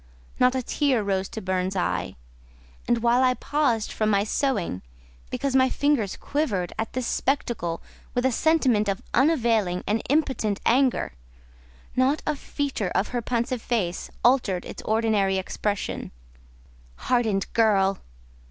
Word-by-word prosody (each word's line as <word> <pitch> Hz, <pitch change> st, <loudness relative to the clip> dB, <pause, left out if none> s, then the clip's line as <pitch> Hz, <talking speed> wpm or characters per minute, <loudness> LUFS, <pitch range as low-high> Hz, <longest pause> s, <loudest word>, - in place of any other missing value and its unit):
Not 250 Hz, +1 st, +4 dB
a 260 Hz, -, -1 dB
tear 265 Hz, -4 st, +1 dB
rose 195 Hz, -1 st, -1 dB
to 220 Hz, -, -6 dB
Burns' 185 Hz, 0 st, -1 dB
eye; 180 Hz, -, -1 dB, 0.7 s
and, 240 Hz, -1 st, +1 dB
while 240 Hz, +2 st, +4 dB
I 255 Hz, -1 st, +3 dB
paused 250 Hz, -4 st, 0 dB
from 215 Hz, -1 st, 0 dB
my 200 Hz, -1 st, +3 dB
sewing, 220 Hz, -, -1 dB, 0.5 s
because 275 Hz, -1 st, -2 dB
my 260 Hz, 0 st, +5 dB
fingers 280 Hz, -10 st, 0 dB
quivered 215 Hz, -, -2 dB
at 225 Hz, -, -3 dB
this 255 Hz, -1 st, -2 dB
spectacle 235 Hz, -12 st, -1 dB, 0.3 s
with 245 Hz, +1 st, +1 dB
a 260 Hz, -, +3 dB
sentiment 255 Hz, -7 st, +2 dB
of 195 Hz, -, -2 dB
unavailing 230 Hz, -, +2 dB
and 215 Hz, +2 st, 0 dB
impotent 265 Hz, -8 st, +1 dB
anger, 255 Hz, -, +2 dB, 0.8 s
not 265 Hz, +4 st, +2 dB
a 305 Hz, -, 0 dB
feature 275 Hz, -8 st, -3 dB
of 195 Hz, -, +1 dB
her 245 Hz, -1 st, -2 dB
pensive 240 Hz, +1 st, -1 dB
face 195 Hz, -9 st, -2 dB, 0.2 s
altered 235 Hz, -8 st, +3 dB
its -, -, -8 dB
ordinary 215 Hz, -3 st, +1 dB
expression. 200 Hz, +2 st, -3 dB, 0.9 s
"Hardened 220 Hz, -, +1 dB
girl!" 195 Hz, -4 st, +3 dB
230 Hz, 135 wpm, -25 LUFS, 200-260 Hz, 0.9 s, my